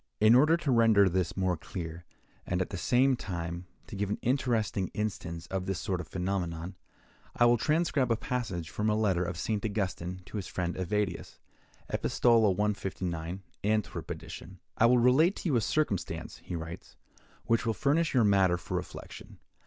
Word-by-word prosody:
In 110 +2 +6
order 155 +7 +6
to 155 -5 -1
render 115 -4 +5
this 90 -1 -1
more 95 -1 +1
clear, 85 0 -7 0.4
and, 90 - -1
at 95 - -2
the - - -4
same 130 +8 +3
time, 85 -4 -5 0.2
to - - -9
give 100 0 -2
an 105 - -1
interesting 115 -7 +1
instance 85 -6 -3
of 95 -1 -2
this 95 -2 -1
sort 90 -2 -2
of 80 - -9
phenomenon, 90 -1 -3 0.6
I 120 - +4
will 120 -1 +4
transcribe 150 -5 +1
a - - +4
passage 110 -9 -3
from 105 +1 0
a 105 - +2
letter 100 -5 +2
of 85 -1 -4
St. 105 +2 -2
Augustine 95 -4 -3
to 105 - -7
his 95 - -4
friend 90 -1 -2
Evadius 95 0 -2 0.5
(Epistola 115 -3 +3
159. 95 -3 -2 0.2
Antwerp 105 -1 -1
edition). 95 +3 -8 0.2
"I 115 - +5
will 125 +1 +5
relate 135 - +4
to 175 - -3
you 140 - +2
a 115 - +3
circumstance," 110 - -1
he 90 - -7
writes, 80 +2 -7 0.5
"which 115 0 +1
will 110 - +1
furnish 145 - +1
you 125 - +5
matter 95 -4 +4
for 85 - -5
reflection. - - -8
100 Hz, 175 wpm, -30 LUFS, 90-115 Hz, 0.6 s, In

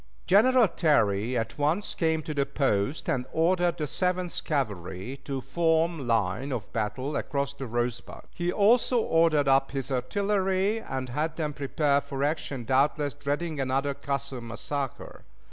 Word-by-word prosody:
General 235 +4 +5
Terry 120 - +2
at 115 +5 -3
once 155 +8 0
came 160 -2 0
to 155 - -4
the 140 -1 +1
post, 135 -1 0
and 125 -1 -1
ordered 175 +1 +2
the 150 - -1
Seventh 180 +3 -1
Cavalry 105 - -3
to 135 -2 -3
form 165 +1 +1
line 115 +4 0
of 115 -6 -5
battle 115 +7 -2
across 140 -1 -2
the 135 -2 -6
Rosebud; 120 +1 -3
he 175 0 -1
also 230 +5 +4
ordered 165 -7 +3
up 135 0 +4
his 135 0 -4
artillery 195 - 0
and 130 - -4
had 155 +5 -2
them 150 -3 -2
prepare 140 0 +1
for 135 0 -4
action, 145 -4 -2
doubtless 140 +3 +2
dreading 145 +2 -3
another 135 +2 0
"Custer 140 -2 -4
massacre." 120 +4 -5
140 Hz, 145 wpm, -27 LUFS, 130-165 Hz, -, General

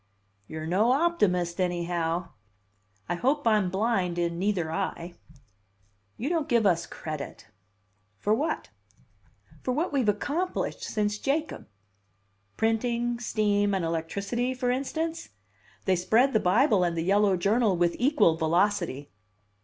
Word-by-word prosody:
"You're 155 0 -6
no 205 +9 +3
optimist, 190 - +1
anyhow!" 175 -1 -1 0.8
"I 175 - -1
hope 270 - 0
I'm 210 -5 +3
blind 190 -3 0
in 170 -1 -1
neither 185 -5 0
eye." 170 +1 -3 1.0
"You 245 - -3
don't 325 -2 -1
give 235 -3 +3
us 175 -3 +2
credit 150 -7 -7 0.4
" 95 +1 -43
"For 210 - +1
what?" 290 +9 -1 0.9
"For 255 - -2
what 310 +4 -1
we've 260 -6 +2
accomplished 325 - -2
since 210 - -1
Jacob." 305 +6 -2 0.9
"Printing, 235 +1 0
steam, 205 -3 +1
and 185 -3 -1
electricity, 200 +10 -2
for 250 -1 0
instance? 320 +6 -3 0.6
They 190 - +3
spread 225 +10 +3
the 220 - +4
Bible 210 +1 +3
and 170 -1 -1
the 165 - 0
yellow 200 +1 +3
journal 205 +1 +2
with 175 0 +1
equal 250 - +3
velocity." 165 -3 0
205 Hz, 130 wpm, -27 LUFS, 175-245 Hz, 1.0 s, the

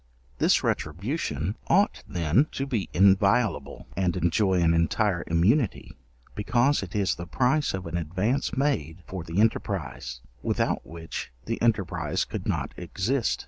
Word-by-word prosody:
This - - +3
retribution 90 - -2
ought - - +3
then 85 - +2
to 135 - -2
be 115 -8 -2
inviolable, 95 - +3
and 90 -2 0
enjoy 90 +3 +2
an 85 -1 +4
entire 85 +2 +1
immunity, 100 - +1 0.4
because 120 +6 +2
it 100 0 -7
is 100 -2 +2
the 85 - -7
price 130 - +1
of 95 - -6
an 85 +1 -3
advance 95 - -1
made 90 - -1
for 95 -3 -6
the 85 +3 -2
enterprize, 100 - -1 0.2
without - - -1
which 80 -4 -6
the 115 - -3
enterprize 105 -7 +1
could - - -5
not - - -1
exist. 105 +9 -1
95 Hz, 140 wpm, -26 LUFS, 85-115 Hz, 0.4 s, an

